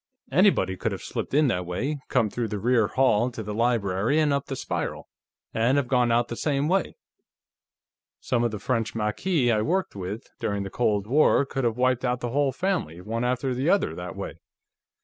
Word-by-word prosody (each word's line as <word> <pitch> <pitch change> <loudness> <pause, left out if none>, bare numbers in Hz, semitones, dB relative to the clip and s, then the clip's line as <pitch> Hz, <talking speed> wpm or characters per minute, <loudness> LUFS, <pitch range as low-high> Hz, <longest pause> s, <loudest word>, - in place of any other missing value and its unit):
"Anybody 135 - +3
could - - -1
have - - -7
slipped - - -4
in 150 0 +5
that 90 -5 -1
way, 135 +12 -2
come 115 -5 +2
through 120 -2 -2
the 105 - -3
rear 115 0 +2
hall 125 -2 +2
to 115 -3 -7
the 105 0 -5
library 115 +2 +1
and 150 -2 +3
up 140 0 -1
the 135 - -3
spiral, - - -4 0.5
and 120 +5 +2
have 140 -3 +1
gone 125 -2 +2
out 120 +1 +2
the 115 - -5
same 140 +2 0
way. 185 +1 0 1.2
Some 120 -3 0
of 120 - +2
the 110 - -5
French 115 +1 -2
Maquis 120 - +1
I 110 -2 +2
worked 185 - -1
with, 100 +4 -6
during 100 -1 -1
the 105 0 0
war, 140 +2 +4
could 135 -1 -3
have 115 -1 0
wiped 130 0 +2
out 125 -1 0
the 120 -1 -3
whole 140 +1 +2
family, 175 - -2
one 115 +6 -3
after 125 +1 0
the 130 +6 0
other, 200 - +2
that - - -7
way." - - -6
125 Hz, 200 wpm, -26 LUFS, 110-140 Hz, 1.2 s, in